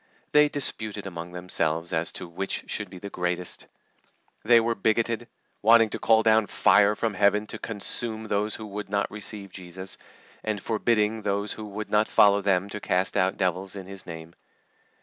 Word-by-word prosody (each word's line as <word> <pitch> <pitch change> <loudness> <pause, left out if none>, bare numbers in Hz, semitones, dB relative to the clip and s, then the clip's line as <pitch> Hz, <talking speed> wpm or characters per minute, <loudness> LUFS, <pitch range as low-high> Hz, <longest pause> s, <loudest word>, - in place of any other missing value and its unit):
They 150 0 +5
disputed 110 -8 -1
among 85 -2 -7
themselves 85 -2 -1
as 80 +1 0
to 90 - -6
which 95 +3 -3
should 105 -3 -3
be 95 - -10
the 100 +2 -8
greatest. 90 0 -3 0.8
They 115 +1 +6
were 115 +1 +1
bigoted, 115 +2 0 0.3
wanting 115 0 +6
to - - -3
call 110 0 +4
down 110 -1 +4
fire 100 +2 +4
from 110 0 -1
Heaven 100 +2 +2
to 110 - -8
consume 110 +1 -2
those 105 +1 0
who 110 - -8
would 105 -1 -6
not 100 0 -1
receive 105 -2 -6
Jesus, 95 +1 -7 0.4
and 110 -2 -2
forbidding 110 0 0
those 100 0 -1
who 110 - -8
would 105 +1 -6
not 105 +1 +3
follow 100 0 +5
them 95 -1 +1
to 105 - -5
cast 90 -1 0
out 95 -1 +1
devils 95 +1 -1
in 95 -2 -7
His 95 0 -8
name. 80 -1 -9
100 Hz, 175 wpm, -26 LUFS, 95-110 Hz, 0.8 s, They